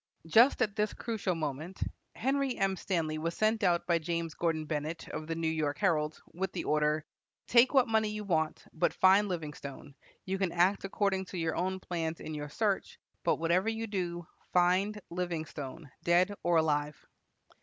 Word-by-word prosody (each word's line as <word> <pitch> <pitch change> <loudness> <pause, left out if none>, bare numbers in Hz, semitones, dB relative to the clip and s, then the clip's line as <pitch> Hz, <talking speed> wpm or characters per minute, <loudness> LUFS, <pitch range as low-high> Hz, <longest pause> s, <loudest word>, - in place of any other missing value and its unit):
Just 235 - +5
at 210 -3 -2
this 210 0 0
crucial 215 -6 -2
moment 155 +3 -4 0.4
Henry 270 +1 0
M. 195 0 +1
Stanley 160 -5 -1
was 165 +2 -3
sent 220 +1 +2
out 175 -2 +3
by 170 -1 +2
James 165 0 -2
Gordon 160 -2 -1
Bennett, 155 +2 -3
of 155 - -5
the 165 - -2
New 165 0 -1
York 155 -2 0
Herald, 155 -6 +1
with 190 +2 -2
the - - -3
order: 150 0 +1 0.4
"Take 250 +3 +5
what 260 -2 +6
money 220 -1 +2
you 210 0 -4
want, 160 -5 0
but 160 - +1
find 195 +2 +5
Livingstone. 150 -4 -6 0.3
You 190 +1 -2
can 190 -3 +1
act 180 +3 +3
according 195 -1 0
to 185 - -7
your 165 -2 -1
own 190 +1 -1
plans 165 -3 -3
in 155 - -6
your 150 -1 -5
search, 200 +4 -1 0.3
but - - +3
whatever 175 +6 +1
you 225 0 -2
do, 175 -5 -3 0.3
find 185 +4 +3
Livingstone 160 -4 -4
dead 175 +4 +3
or 175 - +2
alive." 150 -2 +1
175 Hz, 175 wpm, -31 LUFS, 160-200 Hz, 0.4 s, what